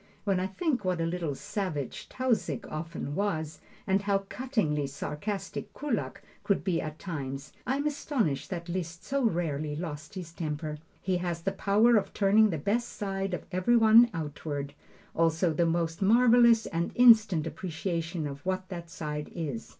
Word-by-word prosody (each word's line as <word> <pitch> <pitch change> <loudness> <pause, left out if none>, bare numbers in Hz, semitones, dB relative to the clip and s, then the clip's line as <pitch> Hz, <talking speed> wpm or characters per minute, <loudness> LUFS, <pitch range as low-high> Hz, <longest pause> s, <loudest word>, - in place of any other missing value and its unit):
When 195 -3 +1
I 185 - 0
think 250 - -1
what 185 -2 0
a 165 - +1
little 165 -4 -2
savage 155 - -4
Tausig 230 - -1
often 155 -2 -4
was, 160 -4 -2 0.3
and 195 0 +2
how 200 -1 0
cuttingly 205 - 0
sarcastic 195 +9 -4
Kullak 225 - -3 0.2
could 200 - +1
be 180 -4 +1
at 155 0 -6
times, 140 -6 -5
I 260 - +2
am 285 +1 -2
astonished 225 - -1
that 170 -1 -5
Liszt 170 -1 -4
so 275 0 -1
rarely 155 -7 0
lost 155 0 -6
his 175 -3 -6
temper. 155 -2 -4 0.2
He 185 -1 +1
has 175 -2 -3
the 195 - +1
power 215 +5 +4
of 195 -2 -2
turning 210 +2 +5
the 165 - -1
best 215 +10 0
side 195 -2 -3
of - - -8
every 185 +6 +3
one 225 +1 +7
outward, 145 -3 -4 0.4
also 165 0 +2
the 170 +2 +2
most 165 0 -1
marvelous 235 +2 +6
and 170 +1 -2
instant 220 -9 +6
appreciation 165 0 -3
of 140 0 -6
what 185 0 -2
that 170 -3 -7
side 150 -2 -5
is. 145 -9 -4
175 Hz, 165 wpm, -29 LUFS, 155-205 Hz, 0.4 s, one